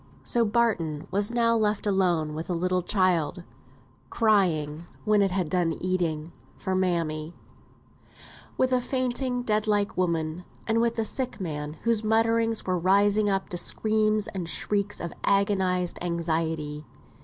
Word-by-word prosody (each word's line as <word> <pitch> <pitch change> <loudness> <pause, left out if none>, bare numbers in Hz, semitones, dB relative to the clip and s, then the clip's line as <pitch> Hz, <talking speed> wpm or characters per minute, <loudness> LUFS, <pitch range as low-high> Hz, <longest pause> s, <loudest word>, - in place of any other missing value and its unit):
So 235 - +2
Barton 205 -10 0
was 200 +2 +1
now 235 -1 +2
left 215 -2 0
alone 175 -6 +1
with 160 +3 -6
a 180 - 0
little 180 +2 0
child, 180 -3 +1 0.7
crying 170 -8 +1 0.2
(when 210 -1 +4
it 195 - +3
had 185 -2 -1
done 170 0 +1
eating) 170 -3 -2 0.3
for 190 - -3
mammy; 170 -4 -1 1.2
with 260 0 +2
a 250 - +3
fainting, 250 0 -1
dead 215 -1 0
like 205 -1 +1
woman; 165 -1 -1 0.2
and 225 0 +1
with 235 0 +1
the 225 -1 -1
sick 255 +2 -2
man, 150 -5 -4
whose 230 -2 +1
mutterings 225 +1 +2
were 185 -1 0
rising 200 +3 +3
up 195 -1 -1
to 175 - -4
screams 215 +3 +1
and 180 -3 -5
shrieks 205 +2 -1
of 170 - -5
agonised 190 -3 +1
anxiety. 160 -3 -2
190 Hz, 145 wpm, -26 LUFS, 170-215 Hz, 1.2 s, when